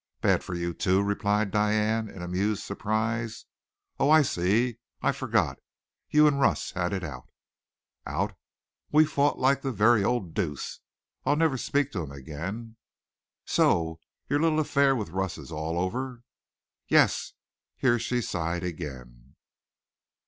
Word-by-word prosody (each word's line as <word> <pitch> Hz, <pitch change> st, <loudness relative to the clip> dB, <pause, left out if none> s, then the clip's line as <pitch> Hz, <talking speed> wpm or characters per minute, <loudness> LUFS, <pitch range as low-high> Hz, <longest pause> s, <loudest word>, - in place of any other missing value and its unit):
"Bad -, -, +3 dB
for 90 Hz, -, -5 dB
you, 85 Hz, 0 st, -2 dB
too?" 95 Hz, +4 st, +2 dB
replied 100 Hz, 0 st, 0 dB
Diane 105 Hz, +1 st, +1 dB
in 90 Hz, -, -9 dB
amused 95 Hz, +4 st, -1 dB
surprise. 110 Hz, +2 st, -2 dB, 0.5 s
"Oh, 140 Hz, -, +3 dB
I 155 Hz, 0 st, +7 dB
see 115 Hz, +3 st, +1 dB, 0.2 s
I -, -, +4 dB
forgot. -, -, 0 dB, 0.5 s
You 150 Hz, 0 st, +6 dB
and 145 Hz, -2 st, +3 dB
Russ 135 Hz, -, +1 dB
had 90 Hz, -1 st, -1 dB
it 95 Hz, -2 st, -2 dB
out." 75 Hz, -, -7 dB, 0.8 s
"Out? -, -, -2 dB, 0.6 s
We 155 Hz, +1 st, +6 dB
fought 145 Hz, -1 st, +1 dB
like 135 Hz, +1 st, +2 dB
the 135 Hz, -, -2 dB
very 110 Hz, -1 st, +4 dB
old 100 Hz, -7 st, -1 dB
deuce. 80 Hz, -9 st, -3 dB, 0.4 s
I'll 145 Hz, -, +2 dB
never 160 Hz, -3 st, +2 dB
speak 140 Hz, +3 st, 0 dB
to 100 Hz, -, -3 dB
him 75 Hz, -, -6 dB
again." 85 Hz, -, -7 dB, 0.7 s
"So 80 Hz, -1 st, +2 dB, 0.3 s
your 145 Hz, -, +1 dB
little 160 Hz, 0 st, +2 dB
affair 140 Hz, -2 st, +3 dB
with 105 Hz, -9 st, -4 dB
Russ 95 Hz, 0 st, -2 dB
is -, -, -10 dB
all 80 Hz, +1 st, -3 dB
over?" 120 Hz, +7 st, -3 dB, 0.6 s
"Yes." -, -, +3 dB, 0.4 s
Here 120 Hz, -2 st, +2 dB
she 120 Hz, +1 st, -1 dB
sighed 85 Hz, -3 st, -2 dB
again. 65 Hz, -7 st, -7 dB
105 Hz, 140 wpm, -27 LUFS, 90-125 Hz, 0.8 s, I